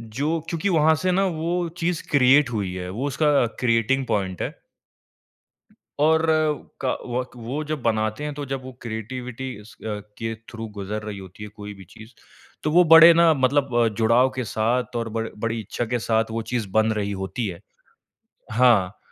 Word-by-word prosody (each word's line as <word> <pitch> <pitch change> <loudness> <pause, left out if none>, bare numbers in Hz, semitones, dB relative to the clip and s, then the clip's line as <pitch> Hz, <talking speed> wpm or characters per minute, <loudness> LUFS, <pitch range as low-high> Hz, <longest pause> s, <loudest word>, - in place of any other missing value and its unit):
जो 140 +9 -2
क्योंकि 170 +4 -1
वहाँ 160 -2 +4
से 185 +3 0
ना 195 +2 +2
वो 170 +1 -1
चीज़ 170 -1 -1
क्रिएट 140 -1 +5
हुई 100 -6 -2
है 90 -1 -5
वो 125 +9 -3
उसका 145 -2 +2
क्रिएटिंग 125 +2 +1
पॉइंट 95 -3 -2
है। - - -4 1.5
और 160 +2 +4 0.6
क 130 - 0
वक 125 +1 -3
वो 125 +6 -4
जब 150 -3 -4
बनाते 110 +3 -1
हैं, 150 -1 -3
तो 145 0 -5
जब 135 -1 -4
वो 130 - -8
क्रिएटिविटी 125 +3 -6
स - - -15
के 105 +1 -5 0.2
थ्रू 115 -1 -7
गुज़र 105 +2 -4
रही 105 -2 -6
होती 95 +2 -11
है 105 - -7
कोई 105 0 -9
भी 95 -1 -13
चीज़, 110 0 -13 0.5
तो 150 - 0
वो 180 +3 +6
बड़े 165 +1 +10
ना 165 -1 +5
मतलब 135 0 +1
अ, 120 -1 +4
जुड़ाव 115 +4 +3
के 130 - -2
साथ 120 +3 -1
और 115 -1 -2
बड़ 115 - -2
बड़ी 115 +1 -2
इच्छा 110 +3 -4
के 120 - +1
साथ 110 0 +1
वो 115 - -2
चीज़ 120 -4 -1
बन 110 +2 +3
रही 100 -2 -2
होती 110 +4 -3
है। 85 -3 -6 0.9
हाँ, 110 -5 +3
120 Hz, 180 wpm, -23 LUFS, 110-145 Hz, 1.5 s, बड़े